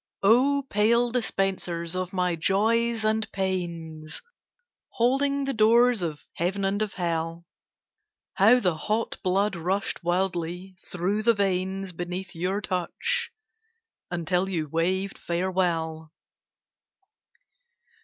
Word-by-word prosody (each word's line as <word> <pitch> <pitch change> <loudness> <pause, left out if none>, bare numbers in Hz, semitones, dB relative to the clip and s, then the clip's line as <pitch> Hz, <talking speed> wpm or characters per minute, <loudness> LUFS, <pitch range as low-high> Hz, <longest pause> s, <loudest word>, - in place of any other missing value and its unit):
Oh, 265 +7 +4
pale 235 +3 +3
dispensers 190 -7 -1
of 185 0 -2
my 180 -2 0
Joys 220 +6 +1
and 220 0 0
Pains, 170 -5 -4 0.7
Holding 275 +3 +1
the 275 - -1
doors 235 0 +4
of 155 -4 -4
Heaven 190 +4 0
and 200 +2 0
of 215 -2 -1
Hell, 165 -1 -2 0.9
How 225 +6 +6
the 180 -7 +1
hot 215 +8 -2
blood 195 +2 +1
rushed 185 +3 -2
wildly 180 +1 -1
through 185 +4 -1
the 230 +1 +4
veins 190 -1 -1
Beneath 180 +1 -5
your 185 +4 -1
touch, 455 - -1 0.8
until 180 +2 0
you 165 -5 -2
waved 185 +5 -1
farewell. 170 -3 -1
190 Hz, 105 wpm, -26 LUFS, 175-215 Hz, 0.9 s, How